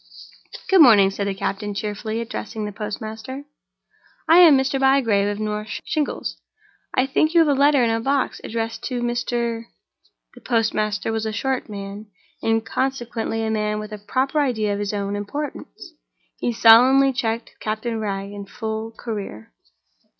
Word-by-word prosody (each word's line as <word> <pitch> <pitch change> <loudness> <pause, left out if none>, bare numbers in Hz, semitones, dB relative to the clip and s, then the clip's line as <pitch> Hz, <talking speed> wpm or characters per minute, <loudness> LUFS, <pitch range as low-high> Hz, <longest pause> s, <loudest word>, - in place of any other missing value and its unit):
"Good 380 -3 +6
morning," 205 -8 +7
said 200 +1 -3
the 195 - -2
captain, 200 +1 -3
cheerfully 215 +2 -3
addressing 225 -2 -5
the 210 - -4
postmaster. 220 +6 -6 0.8
"I 330 +2 +7
am 325 -6 +8
Mr. 265 +1 0
Bygrave 255 -7 +3
of 205 0 -3
North 210 0 -3
Shingles. 240 - -3 0.5
I 255 - +3
think 310 +4 +1
you 335 - +7
have 320 - +3
a 290 - +3
letter 285 -3 +5
in 230 -1 +2
the 225 - 0
box, 270 +3 -1
addressed 225 0 -4
to 245 -2 -3
Mr.—?" 235 -1 -2 0.7
The - - -15
postmaster 215 -2 0
was 220 0 -2
a - - -2
short 255 +4 -2
man, 200 +1 -7 0.3
and 225 0 +1
consequently 240 -4 -2
a 220 - -1
man 210 -1 -1
with 215 0 -6
a 210 - -7
proper 260 +8 -1
idea 220 -7 0
of 200 - -3
his 205 -1 -2
own 200 -1 -3
importance. 290 - -6 0.5
He 240 - 0
solemnly 255 +4 +6
checked 230 -3 -3
Captain 220 +1 -3
Wragge 200 -2 -4
in 200 -1 -8
full 220 +1 -4
career. 200 - -6
225 Hz, 160 wpm, -22 LUFS, 210-260 Hz, 0.8 s, am